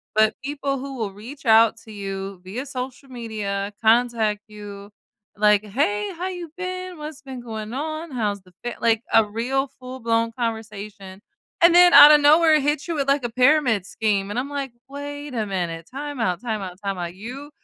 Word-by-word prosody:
but 215 Hz, 0 st, +4 dB
people 280 Hz, 0 st, -2 dB
who 270 Hz, 0 st, -7 dB
will 215 Hz, -4 st, -3 dB
reach 255 Hz, +8 st, -11 dB
out 225 Hz, 0 st, +5 dB
to 220 Hz, -, -12 dB
you 195 Hz, -2 st, -6 dB
via 215 Hz, +9 st, -5 dB
social 265 Hz, 0 st, -6 dB
media, 210 Hz, -4 st, -4 dB
contact 225 Hz, -2 st, +2 dB
you, 205 Hz, -1 st, -10 dB, 0.5 s
like, 210 Hz, 0 st, +4 dB
"Hey, 385 Hz, -, 0 dB
how 355 Hz, +2 st, -4 dB
you 355 Hz, -4 st, -6 dB
been? 365 Hz, -1 st, -5 dB
What's 300 Hz, -1 st, -7 dB
been 265 Hz, -2 st, -8 dB
going 220 Hz, -2 st, -6 dB
on? 310 Hz, +3 st, -4 dB
How's 210 Hz, -5 st, -2 dB
the 180 Hz, -, -21 dB
fa" 240 Hz, 0 st, -4 dB
like, 225 Hz, -1 st, +3 dB
a 225 Hz, -, +6 dB
real 240 Hz, +6 st, -1 dB
full-blown 230 Hz, -3 st, -2 dB
conversation, 215 Hz, -4 st, -5 dB, 0.4 s
and 340 Hz, 0 st, +7 dB
then 355 Hz, 0 st, +8 dB
out 295 Hz, -, +11 dB
of 300 Hz, -, +7 dB
nowhere, 310 Hz, +1 st, +6 dB
hits 295 Hz, +2 st, -1 dB
you 335 Hz, -, -2 dB
with, 280 Hz, -2 st, -1 dB
a 275 Hz, -3 st, +1 dB
pyramid 250 Hz, -5 st, +3 dB
scheme, 200 Hz, -3 st, -1 dB
and 205 Hz, -, -4 dB
I'm 270 Hz, +3 st, -4 dB
like, 280 Hz, -3 st, -4 dB, 0.2 s
"Wait 285 Hz, 0 st, -7 dB
a 225 Hz, -3 st, -1 dB
minute. 170 Hz, -4 st, -3 dB
Time 285 Hz, +2 st, -6 dB
out, 180 Hz, -6 st, 0 dB
time 220 Hz, -4 st, -3 dB
out, 180 Hz, -2 st, -7 dB
time 195 Hz, -1 st, -2 dB
out. 175 Hz, 0 st, -5 dB
You 250 Hz, +9 st, -8 dB
240 Hz, 185 wpm, -23 LUFS, 210-285 Hz, 0.5 s, out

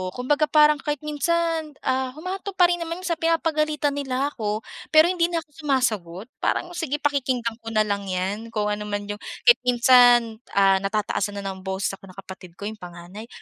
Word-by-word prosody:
kumbaga 290 Hz, +5 st, +1 dB
parang 300 Hz, -1 st, +5 dB
kahit 295 Hz, 0 st, -3 dB
minsan, 320 Hz, 0 st, -1 dB
ah 260 Hz, 0 st, 0 dB
humahantong 375 Hz, +4 st, -6 dB
pa 355 Hz, -2 st, +5 dB
rin 350 Hz, -, -1 dB
naman 335 Hz, +2 st, -5 dB
sa 335 Hz, -3 st, -2 dB
pinapagalitan 310 Hz, -3 st, +1 dB
nila 275 Hz, 0 st, -2 dB
ako 215 Hz, -4 st, -3 dB, 0.3 s
pero 315 Hz, +3 st, +6 dB
hindi 345 Hz, -2 st, +1 dB
na 335 Hz, -2 st, -2 dB
ako -, -, -48 dB
sumasagot. 215 Hz, -, -1 dB
Parang 350 Hz, -, -1 dB
sige 325 Hz, -5 st, -3 dB
pakikinggan 260 Hz, -5 st, -1 dB
ko 225 Hz, -, -16 dB
na 215 Hz, -1 st, +3 dB
lang 200 Hz, -1 st, -3 dB
'yan 190 Hz, +4 st, -3 dB
kung 210 Hz, -2 st, -2 dB
ano 210 Hz, 0 st, -4 dB
man 205 Hz, 0 st, -3 dB
yung 205 Hz, -, -6 dB, 0.2 s
kahit 475 Hz, -, +6 dB
minsan, 245 Hz, -2 st, +5 dB, 0.2 s
ah, 195 Hz, -1 st, +5 dB
natataasan 205 Hz, 0 st, -2 dB
na -, -, -7 dB
ng 190 Hz, -, -9 dB
boses 190 Hz, 0 st, -1 dB
ako 195 Hz, -, -16 dB
na 185 Hz, -, -14 dB
kapatid 185 Hz, -3 st, -11 dB
ko -, -, -11 dB
yung 215 Hz, +1 st, -5 dB
panganay 180 Hz, +4 st, -10 dB
250 Hz, 190 wpm, -23 LUFS, 205-310 Hz, 0.3 s, pero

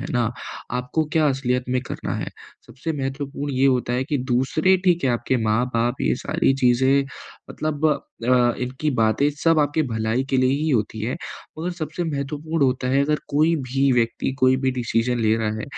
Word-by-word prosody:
है -, -, -4 dB
ना, 120 Hz, -2 st, +1 dB, 0.4 s
आपको 125 Hz, +6 st, -1 dB
क्या 155 Hz, -2 st, +3 dB
असलियत 125 Hz, -2 st, 0 dB
में 125 Hz, 0 st, +1 dB
करना -, -, -4 dB
है। -, -, -4 dB, 0.4 s
सबसे 135 Hz, +7 st, -5 dB
महत्वपूर्ण 140 Hz, +1 st, -4 dB
ये 135 Hz, +2 st, +3 dB
होता 125 Hz, -2 st, +1 dB
है 130 Hz, +2 st, 0 dB
कि 145 Hz, -1 st, -1 dB
दूसरे, 155 Hz, +9 st, +3 dB
ठीक 175 Hz, -4 st, +3 dB
है, 130 Hz, -, +3 dB
आपके 120 Hz, +2 st, 0 dB
माँ-बाप, 120 Hz, +2 st, 0 dB
ये 65 Hz, -1 st, +2 dB
सारी 135 Hz, -, +2 dB
चीज़ें 130 Hz, +3 st, +4 dB, 0.5 s
मतलब 155 Hz, 0 st, -1 dB, 0.4 s
अ, 120 Hz, -1 st, +4 dB
इनकी 130 Hz, +5 st, -2 dB
बातें 115 Hz, +2 st, +2 dB
सब 160 Hz, +2 st, +2 dB
आपकी 150 Hz, +1 st, +2 dB
भलाई 115 Hz, 0 st, -1 dB
के 135 Hz, -, +2 dB
लिए 130 Hz, 0 st, +3 dB
ही 150 Hz, +3 st, 0 dB
होती 110 Hz, -3 st, 0 dB
है, 120 Hz, +7 st, -2 dB, 0.4 s
मगर 170 Hz, +3 st, -2 dB
सबसे 170 Hz, 0 st, -4 dB
महत्वपूर्ण 150 Hz, +1 st, -2 dB
होता 130 Hz, -1 st, 0 dB
है 135 Hz, +2 st, +3 dB
अगर 150 Hz, +1 st, +1 dB
कोई 155 Hz, +3 st, +3 dB
भी 135 Hz, +2 st, +2 dB
व्यक्ति 120 Hz, +2 st, 0 dB
कोई 130 Hz, 0 st, +4 dB
भी 130 Hz, -, +3 dB
डिसीज़न 120 Hz, -1 st, 0 dB
ले 110 Hz, -1 st, +3 dB
रहा 110 Hz, -1 st, -1 dB
है, -, -, -4 dB
130 Hz, 185 wpm, -23 LUFS, 120-145 Hz, 0.5 s, चीज़ें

